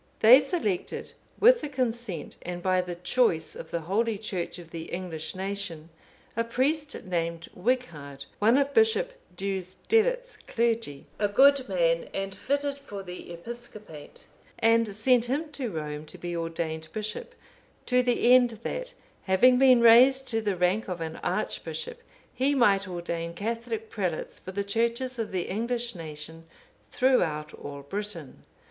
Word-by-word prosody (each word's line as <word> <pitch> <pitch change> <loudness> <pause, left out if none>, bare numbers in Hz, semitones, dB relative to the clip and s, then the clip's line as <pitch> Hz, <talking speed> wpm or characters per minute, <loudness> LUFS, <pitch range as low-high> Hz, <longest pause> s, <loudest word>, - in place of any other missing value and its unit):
They 235 +4 +9
selected, 270 - -2 0.3
with 485 +2 +6
the 300 - -4
consent 235 - -3
and 175 0 -6
by 185 -1 +3
the 180 -1 -5
choice 175 -4 +1
of - - -8
the 170 - -2
holy 210 +6 0
Church 190 -5 -4
of 170 -2 -12
the 165 -1 -6
English 175 -2 -5
nation, 190 -4 -5 0.5
a 230 - +1
priest 285 +6 -1
named 170 -2 -3
Wighard,(500) 165 - -2
one 225 +5 +5
of 280 0 +1
Bishop 450 +3 +3 0.2
Deusdedit's 440 - 0
clergy, 230 -11 -1
a 205 - +3
good 270 +4 +5
man 165 -3 +1
and 195 0 -3
fitted 280 +4 -2
for 205 -8 -8
the 180 -1 -9
episcopate, 210 -4 -10 0.3
and 225 -2 +3
sent 240 +2 +3
him 295 +5 -2
to 265 -5 -4
Rome 150 -3 -5
to - - -8
be 175 -1 -5
ordained 165 -1 -3
bishop, 215 -1 -5 0.5
to 250 0 +3
the 245 0 +3
end 245 -3 +4
that, - - -4 0.3
having 250 +7 +5
been 255 -3 +6
raised 255 +4 +7
to 225 -1 0
the 205 -3 0
rank 180 +5 +1
of 180 -2 -4
an 160 -1 -5
archbishop, 485 0 -3 0.3
he 270 +3 +2
might 205 -6 +4
ordain 170 -1 -4
Catholic 225 +2 -4
prelates 185 -7 -3
for 185 - -8
the 200 +1 -2
Churches 235 +4 -1
of 225 - -3
the 185 -2 -1
English 235 +3 -2
nation 160 -1 -8 0.4
throughout 160 - +1
all 140 -1 -8
Britain. 185 -2 -5
210 Hz, 150 wpm, -27 LUFS, 175-250 Hz, 0.5 s, They